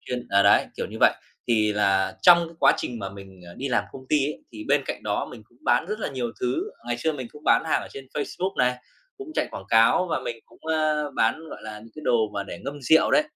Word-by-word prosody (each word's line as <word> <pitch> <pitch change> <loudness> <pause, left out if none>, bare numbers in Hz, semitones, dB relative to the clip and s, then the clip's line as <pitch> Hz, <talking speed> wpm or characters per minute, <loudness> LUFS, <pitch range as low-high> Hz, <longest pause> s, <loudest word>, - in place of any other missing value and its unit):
chuyên 125 -1 -5
ờ, 100 0 +5
đấy, 100 - +5
kiểu - - -2
như - - -9
vậy. - - +7 0.4
Thì 110 -2 +3
là 100 -2 +2
trong 170 -1 +7
cái 165 - -15
quá - - +7
trình 120 -2 -4
mà 100 -2 -4
mình, 95 -2 -12
ờ, 85 - -11
đi 135 +2 -4
làm 125 - +1
công 130 - -9
ty 145 -2 +3
ấy, 150 - -6
thì 110 -1 -8
bên 145 0 +3
cạnh - - -4
đó 105 -1 -1
mình 115 -3 -11
cũng 120 +2 -29
bán - - +3
rất 210 +2 -3
là - - -2
nhiều 125 -3 -3
thứ. 125 +1 -1 0.2
Ngày 120 0 -2
xưa 160 +5 0
mình 130 -4 -6
cũng 150 - -14
bán - - +4
hàng 160 - +1
ở - - -9
trên 135 -1 -9
Facebook 185 +6 -3
này, 125 0 +3 0.4
cũng 400 -4 -9
chạy - - 0
quảng 95 - -8
cáo 115 +11 +5
và - - 0
mình 120 - -4
cũng, - - -21
ơ, 155 -2 +1
bán, 115 +8 +2
gọi - - -9
là, 110 -1 -7
những 115 +1 -14
cái 155 - -9
đồ 110 -3 +2
mà 100 - -1
để - - -8
ngâm 140 +1 -5
rượu 160 +6 +5
đấy. 300 - +5
125 Hz, 270 wpm, -25 LUFS, 110-150 Hz, 0.4 s, vậy